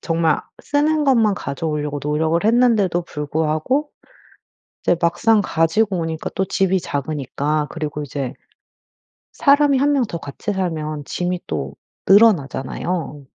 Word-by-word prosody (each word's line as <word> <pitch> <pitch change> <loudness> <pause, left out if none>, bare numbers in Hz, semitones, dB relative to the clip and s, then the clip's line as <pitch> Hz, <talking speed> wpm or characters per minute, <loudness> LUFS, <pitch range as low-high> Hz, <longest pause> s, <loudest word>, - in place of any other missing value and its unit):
정말 165 -2 +1 0.2
쓰는 300 +1 +1
것만 225 -7 +3
가져오려고 150 -1 -3
노력을 160 +4 0
했는데도 220 -6 +3
불구하고 155 - -1 0.9
이제 175 - +2
막상 210 +6 +3
가지고 185 +4 +1
오니까 160 -1 -3
또 190 - 0
집이 190 -1 +1
작으니까 150 +1 -2
그리고 150 -2 -4
이제 135 -2 -4 1.0
사람이 280 -1 +4
1 290 +2 +3
명 270 -4 +2
더 170 - -5
같이 160 +8 -5
살면 155 -6 -3
짐이 180 +4 -2
또 - - -4 0.3
늘어나잖아요. 165 - +2
170 Hz, 280 characters per minute, -20 LUFS, 150-215 Hz, 1.0 s, 사람이